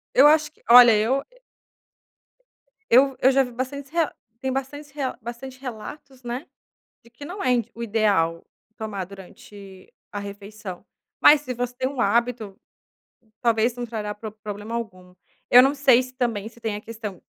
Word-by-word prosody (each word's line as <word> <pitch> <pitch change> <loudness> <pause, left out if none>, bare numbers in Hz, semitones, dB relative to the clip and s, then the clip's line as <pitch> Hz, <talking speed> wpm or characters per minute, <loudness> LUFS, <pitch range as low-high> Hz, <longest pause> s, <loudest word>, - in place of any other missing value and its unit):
Eu 280 +3 +8
acho 305 0 +4
que - - -30
olha 240 -2 +9
eu 255 +6 +1
é - - -25 1.5
Eu 265 +2 +5
eu 265 - +5
já 270 0 +4
vi 245 - -7
bastante 265 +3 -5
rea 330 -3 0 0.3
tem 265 0 -2
bastante 275 +2 -5
rea 275 -3 -3
bastante 255 +3 -8
relatos, 260 +2 -9
né, 245 +4 -5 0.6
de 235 - -19
que 265 +5 -12
não 370 +6 -6
é 255 - +1
indi 235 -3 0
o 235 - -7
ideal 200 -7 +1 0.3
tomar 205 -4 -4
durante 195 0 -14 0.2
a 205 - -4
refeição. 200 -1 -8 0.4
Mas 295 -1 +7
se 255 -3 -5
você 245 +1 -3
tem 260 - -1
um 275 -3 -5
hábito, 225 -1 0 0.8
talvez 230 0 +2
não 245 0 -5
trará 210 -2 -4
prob 215 0 -9
problema 210 +2 -6
algum. 185 -6 -6 0.4
Eu 250 - +10
não 275 +2 +3
sei 265 -3 +5
se 255 0 -11
também 225 -5 -2
se 235 0 -19
tem 220 -2 -3
a - - -7
questão 215 -5 -8
235 Hz, 175 wpm, -24 LUFS, 210-265 Hz, 1.5 s, Eu